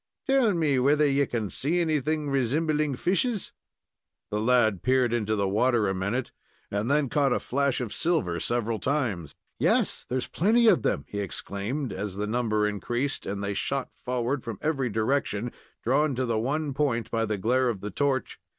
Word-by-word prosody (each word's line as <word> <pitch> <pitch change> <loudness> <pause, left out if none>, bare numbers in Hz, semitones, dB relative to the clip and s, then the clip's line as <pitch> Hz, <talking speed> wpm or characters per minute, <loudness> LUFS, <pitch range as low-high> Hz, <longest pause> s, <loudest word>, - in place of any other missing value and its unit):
"Tell 265 -7 +3
me 150 -6 +2
whether 145 +4 +4
ye 140 0 +2
can 110 -5 -3
see 165 +6 0
anything 155 -2 0
resimbling 150 +2 +1
fishes?" 200 +4 0 0.8
The 105 - 0
lad 110 -5 +3
peered 125 0 +2
into 110 -2 0
the 100 -2 0
water 110 +2 +2
a 95 - 0
minute, 100 +7 -2 0.4
and 100 +4 -1
them 145 0 +3
caught 140 +1 +2
a - - +1
flash 140 0 0
of 120 -5 -4
silver 155 - 0
several 115 +2 -1
times. 115 - -1 0.2
"Yes, - - +2
there's 130 0 -1
plenty 225 +7 +3
of 215 - +5
them!" 70 - 0
he 105 - -5
exclaimed, 100 +7 -4
as 95 0 -4
the 105 +1 -2
number 110 -2 +1
increased, 120 +7 -2
and 100 0 -3
they 100 0 -1
shot 135 +6 -2
forward 125 +2 -2
from 115 -4 -5
every 135 -5 0
direction, 110 0 0 0.3
drawn 140 +3 +2
to 130 +1 0
the 115 -2 0
one 145 +5 -1
point 130 -5 0
by 115 0 +1
the 110 -2 -1
glare 125 +5 +2
of 105 -5 -3
the 105 - -5
torch. 135 +5 -1
125 Hz, 180 wpm, -27 LUFS, 110-145 Hz, 0.8 s, of